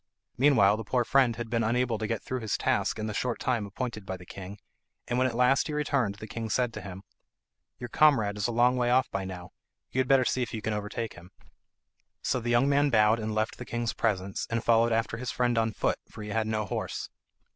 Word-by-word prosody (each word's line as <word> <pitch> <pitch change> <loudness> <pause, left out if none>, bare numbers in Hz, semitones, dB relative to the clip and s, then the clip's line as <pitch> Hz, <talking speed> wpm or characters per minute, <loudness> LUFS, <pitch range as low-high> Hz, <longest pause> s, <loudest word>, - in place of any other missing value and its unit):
Meanwhile 115 -7 +4
the 110 - -5
poor 120 +3 +1
friend 130 -2 +3
had 120 0 -5
been 115 0 0
unable 120 0 0
to 110 - -2
get 115 -1 -3
through 130 - -3
his 110 -3 -2
task - - 0
in 110 - -3
the 110 - -3
short 120 +3 -2
time 115 -5 -1
appointed 110 +1 -5
by 95 -1 -5
the 90 - -13
king, 95 +2 -9 0.5
and 120 +1 0
when 130 - +3
at 120 - -4
last 125 +2 +3
he 155 - -4
returned 140 -8 0
the 105 - -9
king 115 +1 -5
said 120 +1 0
to - - -6
him, 95 -1 -9 0.7
"Your 120 - -6
comrade 115 -7 +3
is 105 +1 -1
a - - -2
long 120 +2 +3
way 120 -1 +1
off 130 +1 +3
by 95 - -2
now; 90 -2 -8 0.4
you 130 - -1
had 130 - +2
better 135 -1 +4
see 130 - 0
if 120 - -3
you 110 - -4
can 110 - -1
overtake 105 +2 -4
him." 90 +1 -14 0.9
So 130 - 0
the 120 0 -4
young 120 +3 +4
man 145 +1 +3
bowed 110 -2 +4
and 110 -1 -3
left 110 +1 -1
the - - -5
king's 120 -1 -2
presence, 100 -3 -1
and 115 0 -1
followed 115 0 +4
after 115 +1 0
his 125 +1 -4
friend 125 -1 +1
on 115 0 +1
foot, - - -1
for 105 - -9
he 105 - -7
had 110 +1 0
no 110 -1 -1
horse. - - -4
115 Hz, 245 wpm, -28 LUFS, 105-125 Hz, 0.9 s, Meanwhile